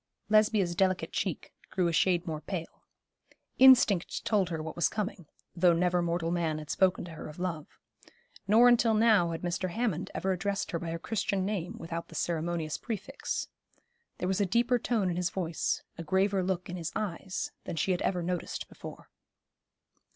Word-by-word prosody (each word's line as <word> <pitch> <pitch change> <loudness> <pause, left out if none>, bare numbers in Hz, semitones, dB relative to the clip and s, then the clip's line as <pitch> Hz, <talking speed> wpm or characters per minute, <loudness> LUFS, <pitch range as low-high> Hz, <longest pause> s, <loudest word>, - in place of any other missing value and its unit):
Lesbia's 215 -4 +3
delicate 185 0 +1
cheek - - -3 0.2
grew 180 -2 +1
a 170 - -1
shade 175 0 +2
more 155 -3 -4
pale. 165 +1 -6 0.8
Instinct 250 -9 +5
told 200 -5 +2
her 165 -2 -3
what 160 0 -5
was 170 - +2
coming, 200 -6 -4 0.3
though 175 0 +5
never 180 +1 +2
mortal 170 -1 -1
man 165 -3 0
had 150 -1 -6
spoken 185 -2 +2
to 175 - -9
her 160 - -8
of 150 - -10
love. 175 -4 -3 0.8
Nor 225 +4 +7
until 235 -2 +4
now 215 -6 +4
had 165 +1 -5
Mr. 175 +1 -1
Hammond 200 -4 -1
ever 190 - 0
addressed 195 +2 -2
her 170 - -1
by 170 - -5
her 165 - -2
Christian 195 0 -1
name 200 +1 -3
without 165 -1 -5
the - - -13
ceremonious 165 -2 -2
prefix. 235 +4 -4 0.7
There 180 - -2
was 190 +2 +1
a - - +3
deeper 240 +5 +2
tone 225 -4 0
in 175 -1 -1
his 180 -1 0
voice, 170 -4 -2 0.2
a - - -3
graver 190 +4 +2
look 180 -1 -2
in 180 - -5
his 170 -1 -4
eyes, 190 -2 -3
than 180 - -4
she 175 +4 0
had 180 - 0
ever 180 -2 0
noticed 180 0 -3
before. - - -11
180 Hz, 180 wpm, -30 LUFS, 170-200 Hz, 0.8 s, Nor